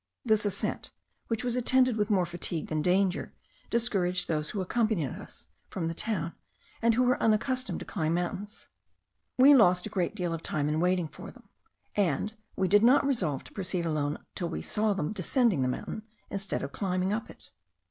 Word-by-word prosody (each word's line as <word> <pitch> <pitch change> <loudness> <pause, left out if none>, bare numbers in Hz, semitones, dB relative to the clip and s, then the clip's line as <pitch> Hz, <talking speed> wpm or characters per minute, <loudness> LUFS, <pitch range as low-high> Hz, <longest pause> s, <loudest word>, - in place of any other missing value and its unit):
This 215 -2 +3
ascent, 200 0 -2 0.4
which 225 0 -1
was 245 -1 0
attended 255 0 +3
with 210 0 0
more 190 -4 +3
fatigue 170 -1 -3
than 155 -1 0
danger, 185 +2 +1 0.3
discouraged 190 -6 0
those 150 -2 -1
who 205 - -4
accompanied 200 - 0
us - - -9 0.2
from 170 -4 -3
the 165 - -2
town, 170 -3 -2 0.5
and 230 -1 +3
who 255 - +3
were 250 0 +2
unaccustomed 225 -2 +1
to - - -6
climb 160 0 -1
mountains. 185 +4 -4 0.7
We 270 +3 +8
lost 180 -8 +5
a - - -4
great 185 +2 -1
deal 175 -4 -2
of 165 - -4
time 150 -3 -1
in 155 +1 0
waiting 180 -1 +1
for - - -10
them, - - -17 0.5
and 200 +1 0 0.2
we 190 - +1
did 205 +2 +5
not 250 +6 +5
resolve 185 - 0
to - - -14
proceed 185 -3 -2
alone 150 -2 -1 0.2
till 175 - -3
we - - -4
saw 215 0 +1
them 190 -1 -2
descending 210 - +2
the 130 - +2
mountain 125 +11 -4 0.3
instead 195 0 -2
of - - -4
climbing 185 +1 -1
up 220 +2 -3
it. - - -15
190 Hz, 190 wpm, -29 LUFS, 170-220 Hz, 0.7 s, We